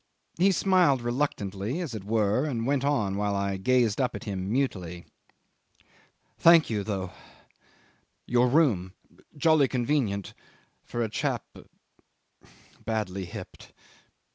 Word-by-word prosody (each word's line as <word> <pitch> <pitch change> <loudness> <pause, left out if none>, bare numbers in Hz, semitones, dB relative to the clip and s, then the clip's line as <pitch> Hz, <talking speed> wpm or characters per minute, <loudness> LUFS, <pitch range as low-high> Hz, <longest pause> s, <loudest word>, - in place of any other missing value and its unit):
He 195 +2 +5
smiled 180 -9 +3
reluctantly 120 - -2
as 165 -9 -4
it 110 -3 -6
were, 110 +3 +1
and 120 -6 -2
went 140 0 +1
on 105 -9 0
while 100 0 0
I 100 0 -1
gazed 120 +2 +2
up 125 - -1
at - - -7
him 95 -2 -4
mutely.... 90 -10 -2 1.3
"Thank 165 -5 +6
you, 105 -2 -1
though 95 -3 -3 1.1
your 125 +1 +3
room 120 - +2 0.4
jolly 155 -2 +4
convenient 120 -7 -1 0.5
for 120 - -3
a - - -1
chap 135 0 -2 1.4
badly 100 -4 -3
hipped."... 85 - -10
115 Hz, 115 wpm, -27 LUFS, 100-140 Hz, 1.4 s, Thank